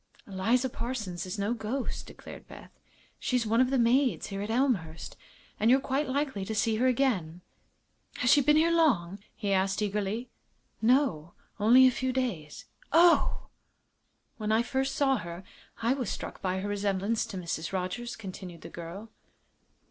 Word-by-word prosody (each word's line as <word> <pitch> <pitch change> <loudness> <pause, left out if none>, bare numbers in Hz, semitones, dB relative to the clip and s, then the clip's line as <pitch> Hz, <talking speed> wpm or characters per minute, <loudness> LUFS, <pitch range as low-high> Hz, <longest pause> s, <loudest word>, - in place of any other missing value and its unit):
"Eliza 225 +7 +1
Parsons 215 -8 -4
is 185 +4 -5
no 205 +3 0
ghost," 240 +3 -4
declared - - -11
Beth. - - -12 0.5
"She's 250 -2 0
one 225 +3 +3
of 255 - +3
the 270 - +1
maids 250 +2 +2
here 195 -1 -4
at 205 - -4
Elmhurst, 220 - -1 0.4
and 220 - +3
you're 260 +2 +6
quite 270 +2 -1
likely 265 -7 -1
to 220 +3 -4
see 220 +1 +1
her 250 +3 +2
again." 210 -11 0 0.7
"Has 245 - +2
she 290 0 +6
been 300 +3 +4
here 325 +2 +4
long?" 210 - +2 0.2
he 200 -3 -1
asked, 195 +1 +1
eagerly. 210 +3 -2 0.5
"No; 220 - +2 0.3
only 240 +5 +7
a 255 - +6
few 260 +1 -2
days." 225 - -3 0.3
"Oh!" 335 +2 +4 0.9
"When 215 -1 -2
I 225 +2 +3
first 265 +2 -1
saw 270 -2 +2
her 170 -2 -7 0.4
I 235 +3 +3
was 255 -6 -3
struck - - -6
by 190 0 -1
her 200 - -3
resemblance 205 +2 0
to 200 - -7
Mrs. 165 -2 -4
Rogers," 190 +6 -3
continued 185 -4 -9
the - - -9
girl. 175 +6 -9
225 Hz, 165 wpm, -29 LUFS, 190-260 Hz, 0.9 s, only